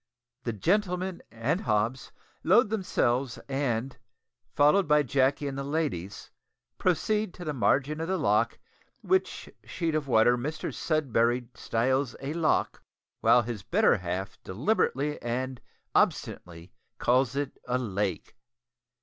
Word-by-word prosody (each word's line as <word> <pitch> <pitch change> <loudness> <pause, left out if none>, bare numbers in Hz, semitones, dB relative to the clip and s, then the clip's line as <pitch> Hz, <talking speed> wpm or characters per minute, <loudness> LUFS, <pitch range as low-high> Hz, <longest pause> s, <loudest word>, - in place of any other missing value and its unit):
The 115 - -1
gentlemen 180 - 0
and 120 - -1
Hobbs 110 +3 -1 0.3
load 210 +5 +4
themselves, 135 - 0
and, 135 -2 -1 0.6
followed 150 +6 +4
by 150 0 +4
Jacky 135 +2 +1
and 135 - -4
the 140 - -3
ladies, 135 - -3 0.5
proceed 210 +3 0
to 175 - -8
the 150 - -2
margin 140 +4 +1
of 165 - -2
the 190 +1 0
loch, 115 - +1 0.5
which 375 0 0 0.2
sheet 165 -3 -2
of 155 -2 -1
water 120 0 +4
Mr 150 +5 -4
Sudberry 125 -6 0
styles 130 +2 0
a 140 +2 -4
"lock," 165 -1 0 0.4
while 120 0 +5
his 115 -3 -5
better - - +3
half 90 +2 -5
deliberately 145 - 0
and 125 +2 -3 0.3
obstinately 85 0 -1 0.3
calls 125 +1 +2
it 140 -1 -3
a 125 0 +1
"lake." 100 -6 -3
135 Hz, 125 wpm, -28 LUFS, 115-155 Hz, 0.6 s, while